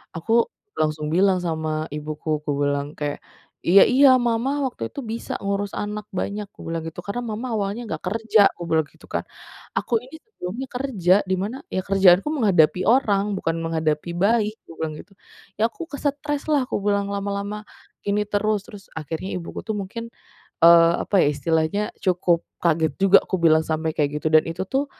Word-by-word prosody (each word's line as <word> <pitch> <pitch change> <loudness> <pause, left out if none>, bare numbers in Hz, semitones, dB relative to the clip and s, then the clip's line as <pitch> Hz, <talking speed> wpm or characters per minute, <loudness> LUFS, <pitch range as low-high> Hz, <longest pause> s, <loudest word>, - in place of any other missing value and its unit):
Aku 225 +8 +2 0.3
langsung 155 0 -1
bilang 190 +2 +3
sama 155 -1 -2
ibuku 150 +1 -3
kubilang 145 0 -1
kayak, 145 -1 -3 0.5
"Iya 195 +3 +8
iya 270 +2 +6
Mama 250 +4 0
waktu 180 - -3
itu - - -9
bisa 230 0 -5
ngurus 200 0 -2
anak 210 0 -4
banyak," 205 +2 -3
kubilang 165 -1 -5
gitu, 170 +2 -8
"karena 200 +6 -4
Mama 235 +4 -4
awalnya 210 +2 -2
nggak - - -5
kerja," 220 0 +4
kubilang 160 -3 0
gitu - - -24
kan, - - -2 0.5
"aku 230 -3 -1
ini 265 +6 -12
sebelumnya 265 - -7
kerja 245 -9 +1 0.2
di - - +3
mana 225 +9 -4
ya - - -2
kerjaanku 195 0 +5
menghadapi 185 - +3
orang 205 -5 +2
bukan 165 - -1
menghadapi 160 0 -1
bayi," 210 +2 +3 0.2
aku - - -17
bilang 155 -1 -2
gitu, 200 - -14 0.4
"ya 225 +2 +1
aku 330 - -8
ke 295 - -12
stres 290 +1 -2
lah," 285 -4 +2
aku 205 - -3
bilang, 200 -1 +1
"lama-lama 200 +1 -3 0.4
ini 205 +1 0
terus." 205 0 0
Terus 200 -2 -12
akhirnya 160 +5 -5
ibuku 170 - -7
tuh 220 -2 -3
mungkin, 230 +4 -6 0.5
eee, 170 0 +7
apa 200 - 0
ya - - +3
istilahnya 160 +6 0 0.2
cukup 180 -2 +1 0.2
kaget 160 -3 +2
juga 195 0 +7
aku 185 -3 -2
bilang 160 -1 +4
sampai 160 0 -1
kayak 150 0 0
gitu 155 - 0
dan 155 0 +5
itu 165 +3 -4
tuh 275 +2 +1
195 Hz, 175 wpm, -23 LUFS, 160-220 Hz, 0.5 s, Iya